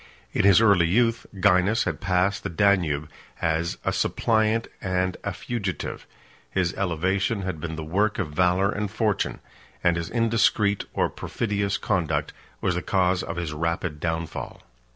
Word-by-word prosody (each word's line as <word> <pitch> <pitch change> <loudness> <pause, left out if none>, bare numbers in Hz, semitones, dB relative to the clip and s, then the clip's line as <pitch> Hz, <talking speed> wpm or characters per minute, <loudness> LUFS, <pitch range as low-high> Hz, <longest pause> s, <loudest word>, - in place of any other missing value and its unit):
In - - +2
his 100 +2 +7
early 100 -6 +5
youth, 115 +5 +2
Gainas 100 +2 +3
had - - -3
passed 95 +1 +1
the 100 - -4
Danube 85 -5 +2 0.3
as 80 +1 0
a - - +1
suppliant 110 0 +1
and 95 -1 0
a - - -2
fugitive: 100 -6 -4 0.4
his 90 +1 0
elevation 95 +4 0
had 95 -4 -3
been 80 0 -4
the 80 - -5
work 100 +7 +1
of 95 -7 -2
valor 90 +5 +2
and 105 -1 -2
fortune; 105 -1 -1 0.4
and 85 -1 +3
his 85 -1 -3
indiscreet 110 -3 +2
or - - +2
perfidious 100 -2 -2
conduct 80 -7 -1 0.3
was 95 - +1
the 90 - -2
cause 95 -1 +1
of 85 - -5
his 85 -3 -3
rapid 85 0 -2
downfall. 80 +1 -4
95 Hz, 155 wpm, -25 LUFS, 85-100 Hz, 0.4 s, his